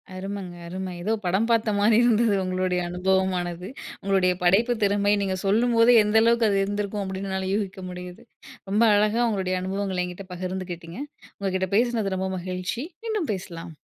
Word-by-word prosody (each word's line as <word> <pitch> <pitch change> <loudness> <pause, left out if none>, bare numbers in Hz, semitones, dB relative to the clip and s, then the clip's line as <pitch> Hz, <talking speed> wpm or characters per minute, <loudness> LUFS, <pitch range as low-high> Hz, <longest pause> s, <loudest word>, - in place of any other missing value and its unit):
அருமங்க. 190 -1 -6
அரும! 185 +2 -5
ஏதோ 210 +5 -1
படம் 190 +6 +1
பார்த்த 230 -1 +2
மாரி 215 +2 +4
இருந்தது 230 -2 +3
உங்களுடய 185 -1 0
அனுபவமானது. 180 -1 0 0.3
உங்களுடைய 190 -2 +2
படைப்பு 215 +8 +4
திறமை! 205 0 +3
நீங்க 190 -1 -1
சொல்லும்போதே 230 +3 +4
எந்த 210 +1 +3
அளவுக்கு 230 -1 +4
அது 195 - +2
இருந்திருக்கும் 205 0 -2
அப்படின்னு 190 0 -4
என்னால 190 0 -2
யூகிக்க 195 -2 -3
முடியுது. 180 0 -8 0.5
ரொம்ப 210 +3 +3
அழகா, 215 +3 +2
உங்களோடய 185 -3 -1
அனுபவங்கள்ல 190 -1 -2
என்கிட்ட 180 +2 -8
பகிர்ந்துக்கிட்டீங்க. 180 0 -6 0.4
உங்ககிட்ட 190 -1 -1
பேசினது 225 -5 +1
ரொம்ப 190 0 -2
மகிழ்ச்சி. 185 +6 -4 0.2
மீண்டும் 430 -8 -2
பேசலாம். 170 -4 -7
190 Hz, 145 wpm, -25 LUFS, 185-210 Hz, 0.5 s, மாரி